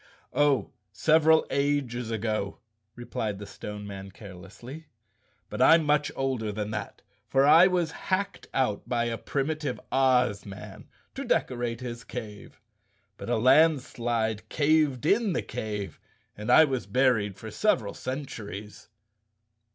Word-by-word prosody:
"Oh, 145 -2 +2 0.2
several 160 +7 +4
ages 140 -5 -1
ago," 110 -3 -2 0.4
replied 110 -4 -4
the 105 - -8
Stone 105 +1 -8
Man 100 -1 -8
care¬ 95 0 -11
lessly. 120 - -11 0.6
"But - - -5
I'm 165 0 +6
much 150 0 +2
older 130 -5 -1
than 105 +1 -4
that, 105 -2 -6 0.2
for 135 0 +3
I 165 +5 +8
was 175 -3 0
hacked 190 +4 -3
out 125 -7 -1
by 120 -1 +1
a 115 -1 -2
primitive 145 -1 -2
Oz 125 -6 +2
man 100 -1 -10 0.3
to - - -5
decorate 120 -1 -1
his 120 -2 -6
cave. 105 -4 -9 0.6
But - - -7
a 120 - +2
landslide 120 -5 +2
caved 150 -3 +2
in 205 +2 +2
the - - -1
cave 105 -2 -5 0.4
and 105 +3 -6
I 160 - +8
was 130 -4 -3
buried 120 -7 +1
for 110 +1 -8
several 110 - +1
centuries." 110 -7 -7
125 Hz, 135 wpm, -27 LUFS, 105-145 Hz, 0.6 s, I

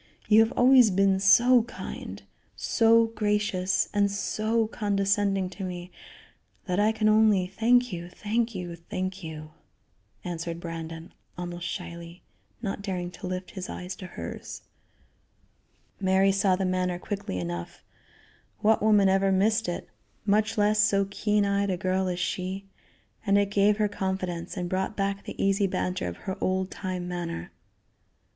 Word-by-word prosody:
You 215 0 +6
have 225 +1 +4
always 250 -2 +6
been 195 0 +3
so 240 +6 +6
kind, 235 +2 -8 0.3
so 230 0 +4
gracious 210 -4 0
and 205 -1 +3
so 215 +3 0
condescending 200 -2 0
to 190 +1 -7
me 180 -1 -6 0.7
that 180 0 -1
I 210 +1 +4
can 220 -1 0
only 215 -3 +4
thank 230 +4 +2
you, 175 0 -6
thank 225 +4 -2
you, 175 -2 -5
thank 185 +3 -5
you," 155 -1 -8 0.7
answered 170 -2 -4
Brandon, 165 0 -7 0.2
almost 175 0 -5
shyly; 170 -1 -7 0.4
not 200 -1 -3
daring 180 -3 -3
to 180 - -8
lift 185 0 -5
his 185 -2 -6
eyes 180 +1 -6
to 185 - -8
hers. 175 - -8 1.4
Mary 190 0 +3
saw 195 -1 +2
the 190 +1 -1
manner 185 -1 0
quickly 200 - -4
enough 85 -1 -5 0.8
what 220 +1 +3
woman 210 -2 +5
ever 195 0 +3
missed 215 +2 +2
it, 175 - -4 0.4
much 215 +1 +2
less 210 +1 +3
so 200 -1 +3
keen 210 0 +1
eyed 200 0 +1
a 185 - 0
girl 185 +1 0
as 180 -1 -2
she 185 +2 -3 0.6
and 200 -2 +3
it 200 0 +1
gave 205 +1 +3
her 210 -1 +2
confidence, 190 -2 -3
and 180 -1 -2
brought 190 +3 -2
back 200 0 -2
the - - -8
easy 195 0 +2
banter 180 - -2
of 85 - -5
her 190 - -4
old 185 0 0
time 185 -2 -4
manner. 170 - -5
195 Hz, 150 wpm, -27 LUFS, 180-210 Hz, 1.4 s, You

